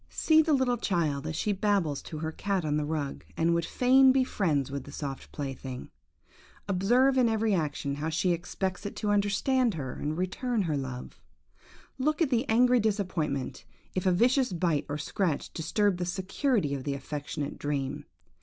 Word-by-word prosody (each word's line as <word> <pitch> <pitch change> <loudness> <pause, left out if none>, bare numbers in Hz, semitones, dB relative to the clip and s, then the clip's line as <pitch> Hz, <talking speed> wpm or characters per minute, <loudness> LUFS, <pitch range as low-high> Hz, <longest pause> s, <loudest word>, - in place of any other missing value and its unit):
See 315 -1 +4
the 315 -1 +1
little 260 -3 +2
child 160 - -1
as 155 - -3
she 210 - 0
babbles 195 -7 +1
to 155 - -7
her 160 +1 -3
cat 195 0 -1
on 150 -1 0
the 150 0 0
rug, 150 -2 -3
and 165 +1 +3
would 170 -1 +1
fain 260 +1 +5
be 260 0 +3
friends 150 - 0
with 140 -2 -4
the 145 - -10
soft 140 -2 -6
plaything. 135 -3 -6 0.8
Observe 245 +8 +3
in 240 -2 +4
every 220 -1 +1
action 150 -4 -1
how 155 +2 -2
she 165 +3 +1
expects 180 +2 -3
it 205 - -5
to 210 - -1
understand 205 +3 +2
her, 135 -5 -4
and 155 +2 -3
return 210 +5 -1
her 160 -4 -1
love. 130 -2 -6 0.8
Look 305 +4 +1
at 320 -5 +2
the 240 +2 +1
angry 245 +2 +5
disappointment, 175 - -1 0.3
if 185 0 -1
a - - +5
vicious 250 +6 +3
bite 165 -4 0
or 145 - -2
scratch 160 0 -2
disturb 190 +4 +1
the 180 - -2
security 190 - 0
of 135 -2 -3
the 140 0 -2
affectionate 145 +1 -5
dream. 140 -2 -2
180 Hz, 180 wpm, -29 LUFS, 150-225 Hz, 0.8 s, fain